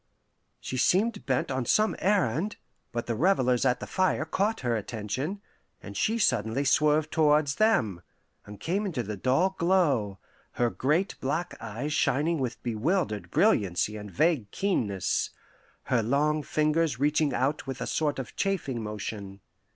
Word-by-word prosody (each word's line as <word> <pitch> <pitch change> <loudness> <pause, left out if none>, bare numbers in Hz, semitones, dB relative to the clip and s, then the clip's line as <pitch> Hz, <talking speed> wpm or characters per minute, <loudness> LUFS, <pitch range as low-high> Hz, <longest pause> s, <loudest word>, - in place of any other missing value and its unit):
She 130 - -5
seemed 195 - +1
bent 130 0 0
on 130 -1 -1
some 215 - +2
errand, 190 - +1 0.4
but 120 0 -3
the 120 - -1
revellers 130 - +2
at 125 - +2
the - - -5
fire 185 -4 0
caught 200 +7 -1
her 120 -2 0
attention, 120 - -4 0.4
and - - -10
she 225 +2 +1
suddenly 125 - +1
swerved 150 +2 +3
towards 150 -2 +3
them, 110 - +2 0.4
and 105 0 -11
came 200 +5 -1
into 140 -10 -2
the 105 0 -5
dull 135 - +2
glow, 145 - +2 0.4
her 120 -1 +1
great 150 - 0
black 155 +6 -2
eyes 130 +8 -4
shining 155 +2 +1
with 125 -3 -4
bewildered 120 - -1
brilliancy 100 +2 +2
and 105 -1 -7
vague 120 - +1
keenness, 105 - 0 0.5
her 125 -3 +1
long 150 +6 +1
fingers 155 -2 +1
reaching 150 +1 +2
out 140 +2 -1
with 135 -1 -5
a - - -3
sort 150 -2 0
of 130 -3 -6
chafing 165 - -1
motion. 105 -2 -6
140 Hz, 150 wpm, -28 LUFS, 115-165 Hz, 0.5 s, swerved